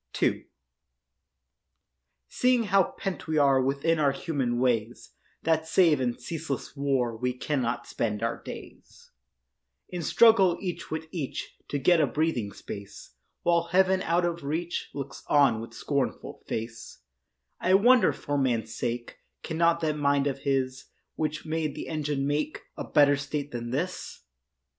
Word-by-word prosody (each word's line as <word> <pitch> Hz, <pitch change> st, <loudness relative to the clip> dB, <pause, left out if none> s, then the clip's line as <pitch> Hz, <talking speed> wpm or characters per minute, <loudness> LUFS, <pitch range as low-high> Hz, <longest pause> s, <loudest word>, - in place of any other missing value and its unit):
II -, -, +1 dB, 1.8 s
Seeing 250 Hz, -, +2 dB
how 195 Hz, -3 st, +2 dB
pent 195 Hz, -4 st, -4 dB
we 155 Hz, 0 st, 0 dB
are 135 Hz, -2 st, +5 dB
Within 140 Hz, +5 st, +1 dB
our 145 Hz, -2 st, +4 dB
human 135 Hz, -5 st, -2 dB
ways, 120 Hz, -2 st, 0 dB, 0.3 s
That 160 Hz, 0 st, +1 dB
save 160 Hz, -5 st, +4 dB
in 120 Hz, -2 st, -1 dB
ceaseless 160 Hz, -6 st, -5 dB
war 135 Hz, -4 st, 0 dB
We 125 Hz, +2 st, -1 dB
cannot 125 Hz, -2 st, -2 dB
spend 105 Hz, -1 st, -2 dB
our 115 Hz, -, -2 dB
days, -, -, -11 dB, 0.8 s
In 180 Hz, -1 st, -4 dB
struggle 195 Hz, 0 st, +5 dB
each 180 Hz, -3 st, -5 dB
with 160 Hz, 0 st, -3 dB
each 155 Hz, -7 st, -5 dB
To 145 Hz, -, -2 dB
get 160 Hz, +5 st, +4 dB
a 145 Hz, -, +3 dB
breathing 150 Hz, -10 st, -1 dB
space, 100 Hz, 0 st, -9 dB, 0.3 s
While 170 Hz, -1 st, +3 dB
Heaven, 190 Hz, +1 st, +3 dB
out 175 Hz, +1 st, +1 dB
of 170 Hz, -2 st, -2 dB
reach, 165 Hz, +5 st, -3 dB
Looks 140 Hz, -1 st, -6 dB
on 140 Hz, -6 st, +4 dB
with 115 Hz, 0 st, -9 dB
scornful 140 Hz, -3 st, -2 dB
face; 115 Hz, -, -6 dB, 0.6 s
I 185 Hz, +1 st, +4 dB
wonder, 235 Hz, +1 st, +6 dB
for 145 Hz, 0 st, -2 dB
man's 115 Hz, -5 st, 0 dB
sake, 120 Hz, 0 st, -4 dB, 0.2 s
Cannot 170 Hz, +1 st, +2 dB
that 155 Hz, -2 st, 0 dB
mind 140 Hz, -1 st, +2 dB
of 140 Hz, -1 st, -1 dB
his 130 Hz, -1 st, -1 dB, 0.3 s
Which 155 Hz, -1 st, -3 dB
made 155 Hz, -2 st, -2 dB
the -, -, -6 dB
engine 150 Hz, -3 st, -1 dB
make 150 Hz, +2 st, -1 dB
A -, -, -5 dB
better 145 Hz, -1 st, +5 dB
state 140 Hz, +1 st, -4 dB
than 120 Hz, -1 st, -5 dB
this? 175 Hz, +9 st, -4 dB
145 Hz, 145 wpm, -27 LUFS, 130-165 Hz, 1.8 s, wonder